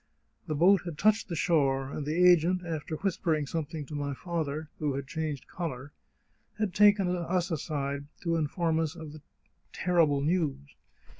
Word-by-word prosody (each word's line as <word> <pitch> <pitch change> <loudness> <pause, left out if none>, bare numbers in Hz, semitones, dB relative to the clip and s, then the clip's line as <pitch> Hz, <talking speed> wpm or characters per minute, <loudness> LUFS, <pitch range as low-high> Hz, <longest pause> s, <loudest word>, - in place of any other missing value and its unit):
The 155 - -1
boat 185 +6 +5
had 170 -4 -6
touched 215 +4 +3
the 170 - -3
shore, 135 -5 +1
and 150 - -4
the 175 +4 +4
agent, 180 +1 +4
after 160 -1 -4
whispering 165 -4 0
some 160 +2 -2
thing 150 0 -7
to 145 - -10
my 145 -1 -3
father, 160 -2 -3
who 145 -3 -1
had 140 0 -4
changed 150 0 -4
colour, 145 -5 -5 0.7
had 210 -4 -1
taken 205 -1 +5
us 175 0 -1
aside 140 -3 -3 0.2
to 170 -2 0
inform 160 +1 0
us 160 -1 -1
of 160 -3 -9
the 155 - -11 0.5
terrible 165 -6 +2
news. 145 -3 -1
160 Hz, 165 wpm, -29 LUFS, 145-175 Hz, 0.7 s, boat